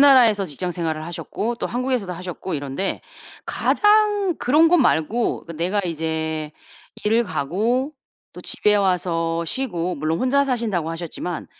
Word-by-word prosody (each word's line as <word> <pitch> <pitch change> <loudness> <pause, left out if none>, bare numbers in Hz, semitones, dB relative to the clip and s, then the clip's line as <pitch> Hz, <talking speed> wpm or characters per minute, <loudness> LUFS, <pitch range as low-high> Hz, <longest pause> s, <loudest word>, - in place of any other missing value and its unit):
나라에서 245 -8 +6
직장 180 +3 -4
생활을 160 -2 -3
하셨고 175 +7 -3
또 - - -2
한국에서도 245 -6 -1
하셨고 180 +1 -6
이런데 145 +6 -3 0.5
가장 415 -4 +3
그런 295 +7 +4
것 355 - +5
말고 230 - +1
그 165 - -7
내가 185 +5 0
이제 160 -2 -2 0.5
일을 225 +3 +3
가고 210 - 0 0.4
또 - - -8
집에 210 0 +1
와서 170 -4 +1
쉬고 180 -6 -2
물론 155 +2 -1
혼자 280 +2 +3
사신다고 220 - -1
하셨지만 170 +1 -5
185 Hz, 305 characters per minute, -22 LUFS, 165-250 Hz, 0.5 s, 나라에서